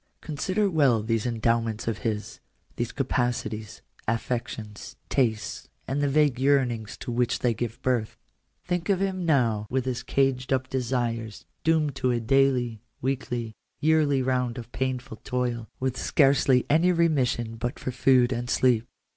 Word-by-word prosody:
Consider 185 +7 -1
well 140 - +3
these 115 +1 0
endowments 115 -1 0
of 115 -2 -1
his 110 -2 -3 0.2
— - - -37
these 120 0 -2
capacities, 120 -5 -2 0.2
affections, 115 -2 -3
tastes, 110 -5 -1 0.2
and 140 +2 -1
the 145 - +2
vague 145 -3 +3
yearnings 130 -6 +1
to - - -4
which 120 0 +1
they 120 -2 +1
give 115 +1 -4
birth. 120 -4 0 0.5
Think 180 +1 -2
of 195 -2 +3
him 190 -3 -1
now 115 -8 +2
with 130 0 0
his 125 -2 -2
caged 135 -1 0
up 130 -1 +1
desires 120 -4 -2 0.2
doomed 155 -4 +2
to 130 - +1
a 120 -1 +1
daily, 125 -2 +2 0.2
weekly, 125 -3 -2 0.3
yearly 150 -3 +3
round 125 -2 0
of 120 -1 -8
painful 125 -3 -3
toil, 120 -2 -2
with 130 -1 -1
scarcely 135 -3 +3
any 165 +5 +4
remission 130 -9 +1
but 120 +2 -3
for 130 - -4
food 125 0 +4
and 120 0 -4
sleep. 120 -3 +2
125 Hz, 150 wpm, -26 LUFS, 115-135 Hz, 0.5 s, any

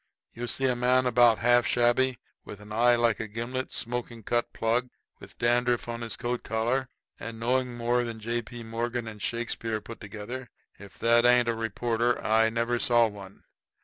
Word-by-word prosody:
You 120 +1 -5
see 135 +3 0
a 125 -1 +2
man 125 +1 +2
about 120 -2 +5
half 120 +1 +4
shabby, 125 +1 +2 0.3
with 100 - -10
an 105 0 -12
eye 120 +2 +4
like 115 -2 +2
a 110 - -3
gimlet, 120 +4 -4
smoking 120 -1 -4
cut 120 +3 0
plug, 120 +3 0 0.3
with - - -14
dandruff 120 0 +1
on 120 0 -4
his 115 -1 -4
coat 120 0 -2
collar, 120 +4 -1 0.3
and 115 0 -7
knowing 125 +1 0
more 120 +1 +1
than 115 -2 -5
J. 115 +2 -2
P. 120 +1 -10
Morgan 115 +1 -3
and 105 -1 -9
Shakespeare 115 0 -2
put 115 +2 -11
together 110 +5 -7 0.3
if 100 -1 -13
that 115 0 +4
ain't 120 0 +5
a - - +2
reporter 115 +2 -1
I 110 +1 +4
never 115 +1 -1
saw 120 -1 +4
one. 100 -2 -12
120 Hz, 180 wpm, -27 LUFS, 115-120 Hz, 0.3 s, about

